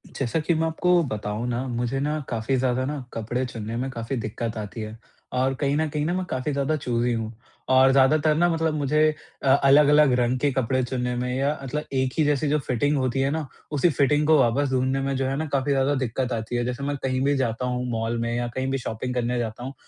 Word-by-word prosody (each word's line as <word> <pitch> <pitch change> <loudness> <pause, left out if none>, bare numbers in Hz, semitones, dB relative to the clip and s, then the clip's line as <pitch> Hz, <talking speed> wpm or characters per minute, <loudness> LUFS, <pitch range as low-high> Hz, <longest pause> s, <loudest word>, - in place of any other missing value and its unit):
जैसा 135 +3 -1
कि 155 +3 +1
मैं 160 0 +1
आपको 175 +2 +2
बताऊँ 105 +2 -3
ना, 120 +2 -2
मुझे 120 +2 -2
ना 150 +2 -1
काफ़ी 115 +3 -1
ज़्यादा 130 0 +1
ना 145 -1 -4
कपड़े 115 +3 -2
चुनने 115 -2 -6
में 130 +2 -2
काफ़ी 115 +1 -4
दिक़्क़त 115 +1 -4
आती 105 0 -6
है। 110 +1 -7 0.4
और 130 +1 +1
कहीं 140 -1 +1
न 160 0 +1
कहीं 150 0 -2
न, 175 +3 0
मैं 185 0 -2
काफ़ी 130 +3 -2
ज़्यादा 140 +2 0
चूज़ी 120 -3 0
हूँ। 115 -1 -3 0.4
और 130 +1 +6
ज़्यादातर 145 +3 +4
ना 175 +2 +3
मतलब 160 -1 0
मुझे 150 0 +1 0.4
अ, - - -1
अलग-अलग 145 +1 +5
रंग 125 +1 +1
के 145 +2 +2
कपड़े 130 0 0
चुनने 125 0 -2
में 125 +1 -2
या 140 +3 0
मतलब 150 +3 -3
एक 130 -1 0
ही 160 - +4
जैसी 145 0 +1
जो 150 +1 +2
फ़िटिंग 145 +2 0
होती 130 0 0
है 135 - +2
ना, 155 -1 -2 0.2
उसी 150 +3 +3
फ़िटिंग 150 0 +2
को 160 - +6
वापस 135 +3 +2
ढूँढने 130 +1 +1
में 135 0 -1
जो 135 - 0
है 135 - -1
ना 160 - -1
काफ़ी 140 +1 +1
ज़्यादा 135 +1 +2
दिक़्क़त 130 -1 -2
आती 110 +1 -3
है। 120 0 0
जैसे 125 +2 -3
मैं 145 +1 -1
कहीं 130 -1 0
भी 145 0 +3
जाता 125 -1 -1
हूँ 125 0 -2
मॉल 115 +1 -1
में 115 0 -1
या 120 0 -1
कहीं 130 0 -1
भी 135 - 0
शॉपिंग 125 0 -4
करने 125 0 -1
जाता 115 0 -4
हूँ। 135 +2 -5
130 Hz, 240 wpm, -24 LUFS, 120-145 Hz, 0.4 s, और